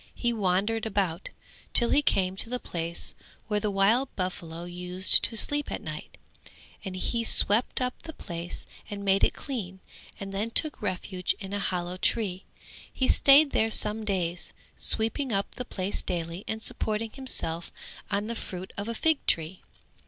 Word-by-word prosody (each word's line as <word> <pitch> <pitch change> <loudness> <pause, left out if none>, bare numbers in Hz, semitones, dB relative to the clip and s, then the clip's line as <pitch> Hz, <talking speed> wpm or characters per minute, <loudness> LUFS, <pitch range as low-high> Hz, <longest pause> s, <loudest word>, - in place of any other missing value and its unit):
He 240 -1 0
wandered 210 +2 0
about, 195 -4 -1 0.4
till 235 - +5
he 290 - +5
came 190 -9 +1
to 225 - -1
the 250 - -1
place 170 -4 -5 0.3
where 210 -2 0
the 210 - -1
wild 210 +7 +3
buffaloes 175 -2 -4
used 180 +2 +3
to 230 - -3
sleep 290 +6 +3
at - - -3
night, - - -7 0.7
and 190 -2 -5
he 230 +5 -1
swept 225 +1 +5
up 250 0 -2
the 320 - -8
place 170 - -7 0.2
and 200 -1 -6
made 195 0 +3
it - - +3
clean 195 -9 -5 0.4
and 195 0 -6
then 205 +3 -1
took 305 +6 +2
refuge 180 0 -2
in 195 -1 -7
a 205 - -1
hollow 180 -2 -1
tree; 190 -2 0 0.5
he 260 - 0
stayed 280 +1 +6
there 220 - +2
some 220 0 +4
days, 180 -4 -2 0.2
sweeping 230 +4 +1
up 195 -1 -1
the 250 - -6
place 195 -3 -3
daily 170 +1 -4
and 220 0 -3
supporting 215 +1 -1
himself 175 -11 -2 0.4
on 205 0 -1
the 230 - -3
fruit 185 -4 -7
of 200 +1 -4
a 230 - -3
fig 320 +4 +1
tree. 165 +3 +1
200 Hz, 165 wpm, -27 LUFS, 180-230 Hz, 0.7 s, stayed